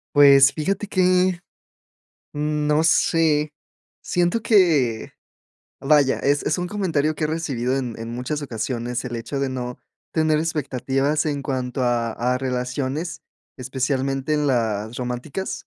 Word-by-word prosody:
Pues, 140 Hz, -1 st, +7 dB
fíjate 195 Hz, +6 st, -2 dB
que, 185 Hz, -2 st, +2 dB, 0.9 s
mm, 150 Hz, 0 st, -1 dB
no 150 Hz, +2 st, +3 dB
sé, 155 Hz, -2 st, +2 dB, 0.5 s
siento 175 Hz, +5 st, 0 dB
que, 160 Hz, -, +2 dB, 0.7 s
vaya, 140 Hz, -1 st, +3 dB
es 145 Hz, +1 st, +1 dB
es 150 Hz, -, +1 dB
un 180 Hz, -, -2 dB
comentario 165 Hz, -7 st, 0 dB
que 155 Hz, -, -2 dB
he -, -, +2 dB
recibido 135 Hz, -6 st, -2 dB
en 125 Hz, -4 st, -3 dB
en 115 Hz, -, -5 dB
muchas 125 Hz, +5 st, -3 dB
ocasiones 120 Hz, -1 st, -3 dB
el 120 Hz, -1 st, -5 dB
hecho 115 Hz, +4 st, -4 dB
de 135 Hz, -1 st, -1 dB
no 125 Hz, -1 st, -5 dB, 0.3 s
tener 155 Hz, -1 st, +2 dB
expectativas 145 Hz, -1 st, -1 dB
en 145 Hz, -2 st, -2 dB
cuanto 130 Hz, -1 st, -3 dB
a 120 Hz, -2 st, 0 dB
a 125 Hz, +2 st, 0 dB
relaciones, 130 Hz, +5 st, -3 dB, 0.4 s
especialmente 135 Hz, +2 st, -2 dB
en 150 Hz, -1 st, +1 dB
las 110 Hz, -3 st, -1 dB
románticas, 125 Hz, +9 st, -5 dB
140 Hz, 135 wpm, -22 LUFS, 125-155 Hz, 0.9 s, Pues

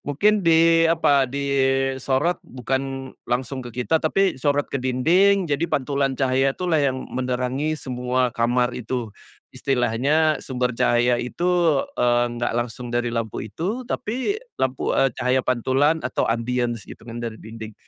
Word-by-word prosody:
mungkin 205 Hz, +10 st, +2 dB
di 165 Hz, -1 st, +5 dB
apa, 145 Hz, -5 st, +3 dB
disorot 135 Hz, +2 st, 0 dB
bukan 135 Hz, +1 st, -4 dB, 0.2 s
langsung 130 Hz, +2 st, -2 dB
ke 125 Hz, 0 st, -5 dB
kita, 160 Hz, +4 st, +2 dB
tapi 190 Hz, +1 st, +1 dB
disorot 145 Hz, +1 st, +1 dB
ke 140 Hz, -, -1 dB
dinding 175 Hz, +11 st, +3 dB
jadi 160 Hz, +1 st, -1 dB
pantulan 140 Hz, -2 st, 0 dB
cahaya 135 Hz, +1 st, +1 dB
itulah 175 Hz, -4 st, +1 dB
yang 130 Hz, -2 st, 0 dB
menerangi 130 Hz, +4 st, -1 dB
semua 125 Hz, -2 st, -1 dB
kamar 120 Hz, +1 st, +1 dB
itu. 125 Hz, -1 st, -4 dB, 0.4 s
Istilahnya 135 Hz, +5 st, +1 dB
sumber 125 Hz, -1 st, -2 dB
cahaya 120 Hz, 0 st, +3 dB
itu, 125 Hz, +8 st, -4 dB, 0.5 s
eee, 120 Hz, 0 st, +3 dB
enggak 120 Hz, 0 st, -2 dB
langsung 120 Hz, +1 st, -3 dB
dari 120 Hz, 0 st, 0 dB
lampu 115 Hz, -3 st, -3 dB
itu, 190 Hz, -, -3 dB
tapi 255 Hz, -, -2 dB, 0.2 s
lampu, 130 Hz, 0 st, -1 dB
eee, 135 Hz, -, +3 dB
cahaya 130 Hz, +1 st, +2 dB
pantulan 130 Hz, +5 st, +2 dB
atau 125 Hz, -, -1 dB
ambience 120 Hz, 0 st, -1 dB
gitu -, -, -12 dB
kan 115 Hz, 0 st, -8 dB
dari 115 Hz, -1 st, -4 dB
dinding, 110 Hz, 0 st, -9 dB
130 Hz, 140 wpm, -23 LUFS, 125-150 Hz, 0.5 s, di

